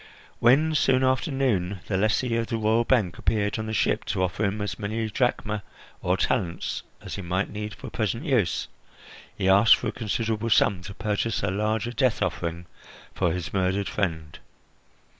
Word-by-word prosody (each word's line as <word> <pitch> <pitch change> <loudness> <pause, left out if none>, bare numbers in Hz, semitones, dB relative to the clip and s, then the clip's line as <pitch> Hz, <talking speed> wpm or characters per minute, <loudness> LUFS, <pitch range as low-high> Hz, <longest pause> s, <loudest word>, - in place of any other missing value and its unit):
When, 145 +7 +4
soon 130 -3 +3
after 130 +5 +1
noon, 100 -9 0
the 100 - -2
lessee 110 +4 +1
of 115 -1 0
the 115 - -2
royal 110 +1 +2
bank 100 -10 +1
appeared 105 0 0
on 110 - -3
the - - -3
ship 110 - +1
to 95 - -1
offer 95 +4 -1
him 100 +1 0
as 100 -4 -4
many 110 +2 -2
drachmae 110 -4 0 0.4
or 90 +1 +1
talents 95 -6 -1 0.2
as - - -6
he - - -4
might 90 +2 -1
need 105 -1 -5
for - - -9
present 115 - -2
use, 120 - +1 0.7
he 95 - 0
asked 100 +4 +7
for - - -3
a - - -3
considerable 115 0 -2
sum 100 -3 +3
to 100 - -8
purchase 105 +1 -1
a - - +1
larger 110 +4 -1
death 125 -2 +1
offering 85 0 -3 0.5
for 90 -3 +1
his 90 0 -4
murdered 95 +1 0
friend. 80 -7 -3
105 Hz, 180 wpm, -26 LUFS, 95-115 Hz, 0.7 s, asked